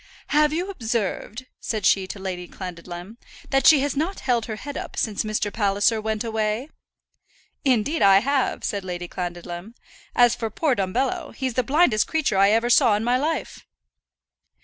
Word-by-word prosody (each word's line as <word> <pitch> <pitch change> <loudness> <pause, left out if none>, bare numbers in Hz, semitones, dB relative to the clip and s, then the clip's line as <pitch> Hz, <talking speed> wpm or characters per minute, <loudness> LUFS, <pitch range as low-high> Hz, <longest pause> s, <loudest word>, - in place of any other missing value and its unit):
"Have 300 0 +4
you 355 +5 -2
observed," 230 - -3
said 215 -4 -3
she 190 -1 +3
to 205 - -7
Lady 185 -2 -5
Clandidlem, 180 +3 -8 0.3
"that 270 -1 +3
she 305 -4 +7
has 285 0 -1
not 325 +7 -2
held 240 -4 0
her 220 - -4
head 285 +6 -7
up - - -6
since 215 -3 0
Mr. 215 -1 -2
Palliser 205 +1 +2
went 220 0 -2
away?" 220 +4 -2 0.9
"Indeed 265 +4 +1
I 195 -1 +7
have," 270 +5 0
said 200 -2 -2
Lady 175 -1 -5
Clandidlem. 175 +4 -6 0.4
"As 240 -1 +5
for 225 -2 -3
poor 300 +4 0
Dumbello, 230 +7 -2
he's 260 -2 -2
the 255 - +2
blindest 265 -4 +3
creature 295 -11 0
I 195 +1 +6
ever 230 +3 +2
saw 240 -4 +5
in 210 - -2
my 245 +2 +2
life." 310 +2 -3
220 Hz, 170 wpm, -23 LUFS, 195-270 Hz, 0.9 s, she